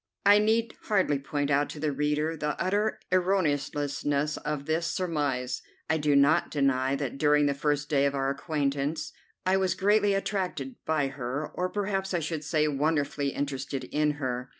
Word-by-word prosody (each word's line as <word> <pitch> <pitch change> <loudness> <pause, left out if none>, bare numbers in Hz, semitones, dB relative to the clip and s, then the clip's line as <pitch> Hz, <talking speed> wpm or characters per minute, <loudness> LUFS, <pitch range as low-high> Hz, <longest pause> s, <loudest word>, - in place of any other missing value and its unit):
I 205 +1 +7
need 225 +2 +2
hardly 190 -9 +2
point 145 +1 -2
out 145 +1 +2
to 150 - -7
the 150 0 0
reader 150 +3 0
the 150 -1 -3
utter 205 +4 0
erroneousness 145 -5 0
of 150 -2 -4
this 160 +2 0
surmise. 145 -9 -1 0.3
I 160 - +3
do 150 -1 +2
not 140 +2 +4
deny 135 -2 +1
that 140 -1 -4
during 150 0 +4
the 140 - +2
first 145 0 0
day 140 -2 +3
of 140 - -2
our 135 0 0
acquaintance 140 0 -2 0.3
I 185 +1 +3
was 190 -1 +1
greatly 205 0 +3
attracted 195 +5 -2
by 155 -3 +1
her, 135 +2 -4
or 180 +1 -1
perhaps 195 -1 -2
I - - +2
should 155 -1 -3
say 155 +1 +1
wonderfully 145 0 0
interested 135 -1 -3
in 150 0 0
her. 130 -3 -3
150 Hz, 170 wpm, -28 LUFS, 140-180 Hz, 0.3 s, I